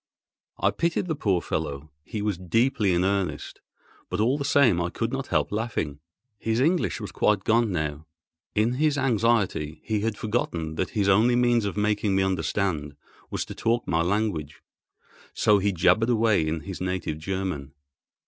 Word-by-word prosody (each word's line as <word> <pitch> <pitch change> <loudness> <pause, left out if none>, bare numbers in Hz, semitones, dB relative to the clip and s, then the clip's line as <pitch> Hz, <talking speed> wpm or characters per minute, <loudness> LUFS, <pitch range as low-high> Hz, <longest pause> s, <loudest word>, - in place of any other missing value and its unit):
I - - +2
pitied 170 +1 0
the 165 - -1
poor 100 - 0
fellow, 70 +2 -4
he 105 +4 -5
was 105 -2 0
deeply 105 +3 +1
in 90 0 +2
earnest; 95 -6 -2 0.5
but - - -3
all 120 +5 +3
the 145 - -3
same 125 -11 +4
I 85 - -1
could 115 +6 -3
not 135 0 -3
help 75 -4 0
laughing. 105 -10 -2 0.4
His 110 +1 0
English 160 -2 +1
was 105 - -6
quite 100 -2 +1
gone 115 -1 +2
now. 80 -2 -3 0.5
In 110 +3 +2
his 150 -2 +2
anxiety 115 - +1
he 110 -2 -1
had 110 0 -2
forgotten 85 -8 -2
that - - -2
his 100 -2 +2
only 110 +5 +4
means 120 -2 +3
of 100 - -3
making 105 -1 +1
me 95 - +3
understand 80 -4 -1 0.3
was - - -3
to - - -8
talk 120 +1 0
my 80 -1 +1
language, 90 -5 -1 0.7
so 105 -1 +4
he 100 +1 +1
jabbered 110 +6 +3
away 110 -8 +3
in 80 0 -2
his 95 +1 -7
native 90 -4 -2
German. 90 -6 -4
100 Hz, 170 wpm, -26 LUFS, 85-115 Hz, 0.7 s, same